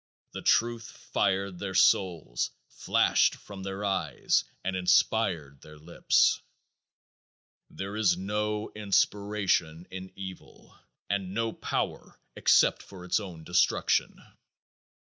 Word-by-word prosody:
The - - -7
truth 115 0 +1 0.2
fired 95 -1 0
their 95 -2 -5
souls, 85 -10 +2 0.2
flashed - - +2
from 100 -2 -11
their 95 +1 -4
eyes, 95 -2 0 0.2
and 95 0 -2
inspired 90 -6 +1
their 75 0 -14
lips. 80 +3 +2 1.3
There 100 +2 -6
is 100 -5 +2
no 105 +2 -2
inspiration 100 -5 0
in 95 0 -8
evil 95 -2 -10 0.3
and 100 -1 -2
no 115 0 -1
power - - -4 0.2
except - - +4
for 95 -2 -12
its 90 - +1
own 90 -6 -9
destruction. 90 +2 +1
95 Hz, 110 wpm, -28 LUFS, 90-105 Hz, 1.3 s, except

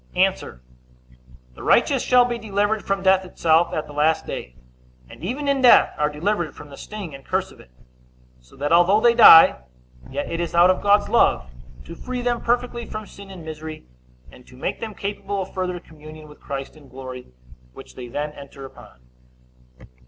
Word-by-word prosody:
A. - - +5 1.3
The - - -13
righteous - - +2
shall 250 -1 +4
be 240 -1 -4
delivered 205 0 -1
from 195 -1 -2
death 190 0 +3
itself 170 -2 +1
at 155 - -3
the 145 - -12
last 155 +2 +1
day, 60 - -7 0.5
and - - -15
even 265 +10 -4
in 280 -1 +1
death 250 - +6
are 150 0 0
delivered 170 +2 -2
from 150 - -13
the - - -10
sting 200 -5 -8
and 135 0 -11
curse - - -2
of - - -18
it; - - -17 0.7
so 60 0 -22
that, 145 +2 -3
although 175 +5 +4
they 235 +1 +4
die, 215 -8 +8 0.5
yet 140 +2 -4
it 165 - -4
is 170 0 -4
out 175 +2 +6
of 185 - -3
God's 205 0 +3
love, 65 0 +2 0.3
to - - -9
free 250 +7 -6
them 240 -1 -1
perfectly 240 -1 -2
from 215 0 -7
sin 200 -1 -13
and 180 -4 -11
misery, 155 - -8 0.5
and 125 - -18
to 125 - -16
make - - -4
them 220 -2 -7
capable 200 -1 -4
of - - -14
further 180 -2 -3
communion 155 -1 -14
with 150 - -16
Christ 135 +1 -7
in 145 -3 -17
glory, 130 -1 -9 0.5
which - - -13
they 125 -1 -9
then 145 +5 -4
enter 140 -1 -12
upon. 65 - -15
175 Hz, 190 wpm, -22 LUFS, 150-210 Hz, 1.3 s, die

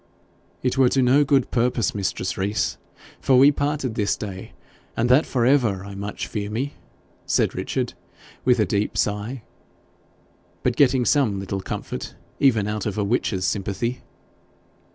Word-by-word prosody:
'It 130 +1 0
were 130 -2 +6
to 135 0 +2
no 135 +4 +5
good 140 -2 +2
purpose, 120 -3 +1
mistress 95 -2 -2
Rees, 100 +3 -1 0.4
for 130 -2 +3
we 140 +3 +7
parted 145 -3 -1
this 105 -3 0
day 95 -3 -7 0.4
and 115 +2 +1
that 130 +5 +5
for 120 -3 +1
ever, 120 -8 +2
I 100 - -8
much 100 +1 -5
fear 105 -1 -4
me,' 130 +7 -3 0.5
said - - +2
Richard - - -2 0.5
with 125 -1 +3
a 105 - +4
deep 100 +2 -1
sigh, 105 +4 -2 1.2
but 125 - +1
getting 130 -2 +3
some 115 -10 +2
little 95 0 -4
comfort - - -6 0.2
even 115 -7 +3
out 105 0 -2
of 105 - -3
a 105 - +1
witch's 100 -3 0
sympathy. 100 +6 -2
115 Hz, 155 wpm, -23 LUFS, 100-130 Hz, 1.2 s, we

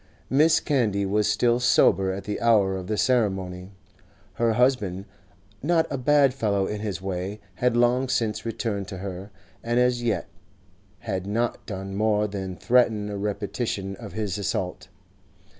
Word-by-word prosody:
Mrs. 155 +4 +4
Candy 110 -9 +1
was 105 +2 +1
still 120 +3 +2
sober 95 -6 +4
at 95 +1 -5
the 105 - -4
hour 105 -5 +3
of 95 -1 -6
the 105 0 -1
ceremony. 95 -7 0 0.6
Her 115 +4 +1
husband, 110 -7 +1 0.6
not 165 +2 +2
a 140 - -1
bad 140 0 +4
fellow 100 -6 0
in 105 +1 -4
his 100 -4 -4
way, 95 +2 -4 0.2
had 125 -1 +1
long 125 +2 +2
since 115 -4 -1
returned 110 -4 -3
to 95 - -7
her, 95 +1 -6 0.3
and 120 +1 +1
as 125 -1 +2
yet 115 -3 -1 0.7
had 95 -4 -3
not 115 +3 -1
done 95 -1 -5
more 105 +1 +1
than 95 -2 -5
threaten 110 -1 +2
a - - -4
repetition 100 -1 -3
of 105 -1 -9
his 105 -2 -3
assault. 95 -2 -3
105 Hz, 155 wpm, -25 LUFS, 95-120 Hz, 0.7 s, Mrs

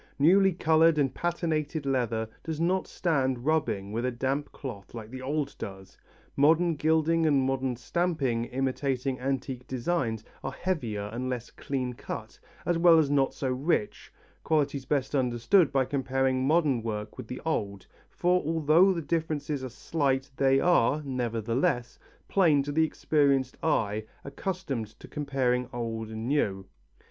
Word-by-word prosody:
Newly 190 +6 +5
coloured 165 -1 +4
and 135 -3 +1
patinated 160 -3 -2
leather 120 -4 0 0.2
does 160 -2 -4
not 180 +3 +1
stand 130 -8 0
rubbing 145 -11 0
with 115 +2 -2
a 125 - +1
damp 135 +4 -2
cloth 120 -7 -8
like 110 -1 -8
the 130 0 -7
old 145 +2 -2
does, 95 -1 -8 0.4
modern 165 +4 +4
gilding 160 +2 +2
and 145 -3 +4
modern 130 -1 -1
stamping 135 -4 -1
imitating 130 0 -1
antique 130 -1 -3
designs 125 -4 -1 0.2
are 135 - -4
heavier 115 - -3
and 125 +2 -3
less 120 -2 -4
clean 130 -3 -3
cut - - -7 0.3
as 175 -1 +1
well 170 -1 +7
as 150 -3 +3
not 135 -2 +2
so 130 -2 -2
rich 130 -4 -1 0.3
qualities 145 -4 0
best 135 -1 -1
understood 130 - +3
by 135 -1 +2
comparing 135 -1 0
modern 150 -6 +3
work 105 -1 -4
with - - -7
the 125 - -6
old, 100 - -2 0.2
for 180 +1 +1
although 160 +4 +4
the 170 -2 -3
differences 150 -3 -2
are 130 - -4
slight 135 +1 -1
they 135 0 +3
are, 150 -4 +3
nevertheless, 120 -1 -1 0.3
plain 160 -8 +4
to 145 - -4
the 160 +2 +3
experienced 140 -4 +1
eye 110 -9 0 0.2
accustomed 140 - -3
to - - -11
comparing 130 -4 -1
old 115 -2 -4
and 110 +1 -5
new. 100 -9 0
135 Hz, 150 wpm, -28 LUFS, 125-155 Hz, 0.4 s, well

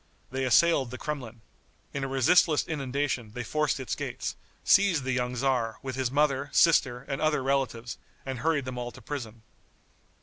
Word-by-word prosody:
They 130 +1 -1
assailed 135 0 +4
the 130 - -7
Kremlin. 125 -7 -6 0.5
In 140 - -3
a - - -1
resistless 145 +4 +3
inundation 135 -6 -2
they 125 - -3
forced 150 +3 0
its 130 - -3
gates, - - -4 0.3
seized 195 -8 +4
the 130 - -1
young 125 -1 -1
tzar, 120 -3 0
with 130 -2 -4
his 130 -2 0
mother, 140 0 +1
sister 135 -7 +3
and 135 -1 -3
other 155 -3 +1
relatives, 125 -4 -1 0.3
and 130 -2 -4
hurried 155 -2 +1
them 130 -1 -5
all 120 0 -4
to 130 - -13
prison. 115 -5 -6
135 Hz, 170 wpm, -28 LUFS, 125-145 Hz, 0.5 s, assailed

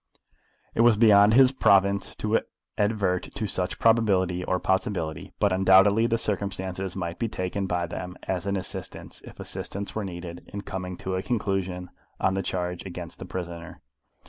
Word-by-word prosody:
It - - +2
was 115 -2 +6
beyond 105 -1 +6
his 130 0 +7
province 100 -6 +3
to 110 +1 +1 0.4
advert 100 -4 0
to 110 - -2
such 90 -2 -2
probability 95 -6 +3
or 90 +1 0
possibility; 95 -5 -1
but 100 -2 +3
undoubtedly 95 +4 +5
the 115 - +1
circumstances 95 -3 -3
might 85 -2 -4
be 115 - 0
taken 95 0 -3
by 90 -1 0
them 90 +2 -6
as 95 0 -2
an 100 0 0
assistance, 95 - -6
if - - -13
assistance 100 +1 -5
were 110 - -2
needed, 85 -2 -7
in 100 - -5
coming 90 -2 -5
to 95 - -4
a 95 - -1
conclusion 95 -5 -2 0.3
on 95 - +2
the 95 - 0
charge 90 -1 -3
against 90 -3 -8
the - - -6
prisoner. 85 -2 -6
95 Hz, 165 wpm, -26 LUFS, 90-100 Hz, 0.4 s, his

